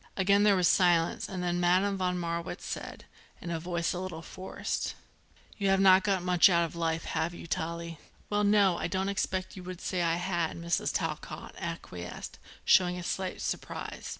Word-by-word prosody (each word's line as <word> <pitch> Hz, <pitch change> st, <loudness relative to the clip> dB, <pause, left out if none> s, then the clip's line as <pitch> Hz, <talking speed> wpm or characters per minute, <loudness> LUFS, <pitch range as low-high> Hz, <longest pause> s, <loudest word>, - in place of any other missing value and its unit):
Again 200 Hz, +1 st, +4 dB
there 205 Hz, -1 st, +5 dB
was 180 Hz, -2 st, +3 dB
silence 175 Hz, -3 st, +3 dB
and 185 Hz, -3 st, -4 dB
then 175 Hz, 0 st, 0 dB
Madame 185 Hz, +3 st, +3 dB
von 180 Hz, -1 st, 0 dB
Marwitz 170 Hz, -1 st, -4 dB
said, -, -, -6 dB, 0.3 s
in 170 Hz, -, -6 dB
a 165 Hz, -, -1 dB
voice 170 Hz, +1 st, -1 dB
a 180 Hz, -, -3 dB
little 180 Hz, -3 st, -6 dB
forced: 190 Hz, +3 st, -4 dB, 0.6 s
"You 200 Hz, -1 st, +1 dB
have 195 Hz, 0 st, +4 dB
not 190 Hz, -1 st, +7 dB
got 195 Hz, -3 st, +1 dB
much 180 Hz, +1 st, +6 dB
out 170 Hz, -2 st, +3 dB
of 165 Hz, -, -8 dB
life, 165 Hz, -1 st, -1 dB
have 160 Hz, +2 st, -2 dB
you, -, -, -9 dB
Tallie?" 170 Hz, 0 st, -4 dB, 0.3 s
"Well, 210 Hz, 0 st, +1 dB
no; 200 Hz, -3 st, +4 dB
I -, -, -1 dB
don't 190 Hz, +2 st, -1 dB
expect 190 Hz, -2 st, -2 dB
you 185 Hz, -, -8 dB
would 180 Hz, -1 st, -7 dB
say 185 Hz, -1 st, -2 dB
as 170 Hz, -, +2 dB
I 165 Hz, -, +2 dB
had," 175 Hz, -2 st, -1 dB
Mrs. 170 Hz, 0 st, 0 dB
Talcott -, -, -4 dB
acquiesced, -, -, -6 dB, 0.3 s
showing 180 Hz, -1 st, +5 dB
a 180 Hz, -, -5 dB
slight 185 Hz, +1 st, -3 dB
surprise. -, -, -4 dB
180 Hz, 190 wpm, -30 LUFS, 170-190 Hz, 0.6 s, not